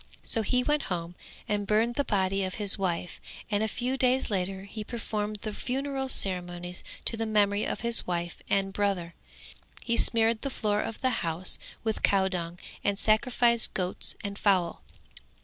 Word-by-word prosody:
So 225 - 0
he 250 +4 +1
went 295 +2 0
home 170 -1 -3 0.3
and 205 -1 -1
burned 220 +3 +2
the 285 - 0
body 195 -4 0
of 185 0 -3
his 205 -2 +5
wife 180 -3 -3 0.3
and 205 0 +1
a 220 - +1
few 250 +4 -2
days 255 -2 +1
later 190 0 -2
he 210 +2 -7
performed 215 -2 -4
the 215 -2 -4
funeral 270 +3 -3
ceremonies 180 -4 -1 0.2
to - - +12
the 225 0 -3
memory 205 -1 +2
of - - -3
his 235 -1 +3
wife 175 -1 -3
and 195 -1 0
brother; 195 -5 -1 0.7
he 235 -1 -1
smeared 225 -1 +2
the 275 - -3
floor 210 -5 -1
of 225 - -6
the 260 - +2
house 170 +2 +2 0.2
with 220 -1 -2
cowdung 185 -3 +1 0.3
and 200 -1 0
sacrificed 235 +2 +2
goats 180 -1 -2
and 200 -1 -5
fowls. 185 -4 +2
205 Hz, 165 wpm, -28 LUFS, 185-230 Hz, 0.7 s, to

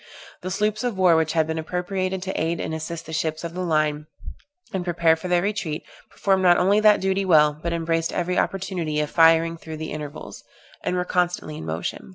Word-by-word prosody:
The 185 - -4
sloops 210 +3 -1
of 240 -5 -2
war 180 -3 +5
which 160 -1 +1
had 160 -2 +2
been 160 +1 -3
appropriated 185 +3 -3
to 190 - -3
aid 165 +1 -1
and - - -3
assist 160 +1 -5
the 160 - -8
ships 160 0 -2
of 170 0 -5
the 185 - -4
line, 155 -3 0 0.7
and 190 -2 -1
prepare 170 -2 +3
for 160 +3 -7
their 175 -1 +2
retreat, 195 -7 -2 0.3
performed 195 -1 +1
not 175 -1 +5
only 195 +3 +3
that 215 -1 +5
duty 190 +1 +1
well, 150 -5 +5
but 170 - -2
embraced 165 0 -1
every 180 +1 0
opportunity 180 -5 -2
of 150 -1 -2
firing 165 0 +4
through 160 -1 -8
the 155 0 -6
intervals, 150 -1 -7 0.4
and - - -1
were 180 0 -1
constantly 175 -4 -1
in 80 - -7
motion. 80 +3 -4
170 Hz, 205 wpm, -23 LUFS, 160-185 Hz, 0.7 s, war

